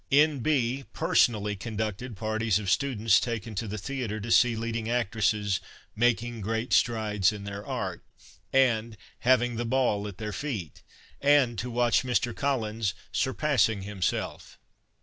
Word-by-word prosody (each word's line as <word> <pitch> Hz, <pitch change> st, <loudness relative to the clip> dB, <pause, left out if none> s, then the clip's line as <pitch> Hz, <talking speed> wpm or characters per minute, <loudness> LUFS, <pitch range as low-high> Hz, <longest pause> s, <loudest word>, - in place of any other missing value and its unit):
N.B. 140 Hz, -3 st, +2 dB
— -, -, -41 dB
Personally 105 Hz, -3 st, +2 dB
conducted 110 Hz, +2 st, -4 dB
parties 110 Hz, -1 st, 0 dB
of 100 Hz, -4 st, -2 dB
students 115 Hz, -4 st, +3 dB
taken 115 Hz, -2 st, -4 dB
to 110 Hz, +3 st, -3 dB
the 105 Hz, +1 st, -4 dB
theatre 115 Hz, -1 st, -4 dB
to 115 Hz, +3 st, -5 dB
see 120 Hz, 0 st, +5 dB
leading 115 Hz, 0 st, -3 dB
actresses 105 Hz, -4 st, +1 dB, 0.2 s
" -, -, -23 dB
making 120 Hz, 0 st, +1 dB
great 110 Hz, +3 st, -2 dB
strides 105 Hz, -4 st, +2 dB
in 105 Hz, -2 st, -7 dB
their 100 Hz, 0 st, -6 dB
art -, -, -4 dB, 0.3 s
" -, -, -35 dB, 0.2 s
and 110 Hz, 0 st, -5 dB
" -, -, -35 dB
having 120 Hz, -1 st, +2 dB
the 120 Hz, -, -1 dB
ball 115 Hz, -5 st, +1 dB
at 100 Hz, -3 st, -8 dB
their 105 Hz, -1 st, -5 dB
feet 115 Hz, -, -5 dB, 0.3 s
" -, -, -29 dB
and 140 Hz, -4 st, +4 dB
to 125 Hz, -, -3 dB
watch 120 Hz, -1 st, +2 dB
Mr. 120 Hz, -2 st, 0 dB
Collins 110 Hz, -7 st, -1 dB
" -, -, -36 dB
surpassing 130 Hz, -7 st, +1 dB
himself." 100 Hz, -3 st, -3 dB
115 Hz, 160 wpm, -28 LUFS, 105-125 Hz, 0.3 s, see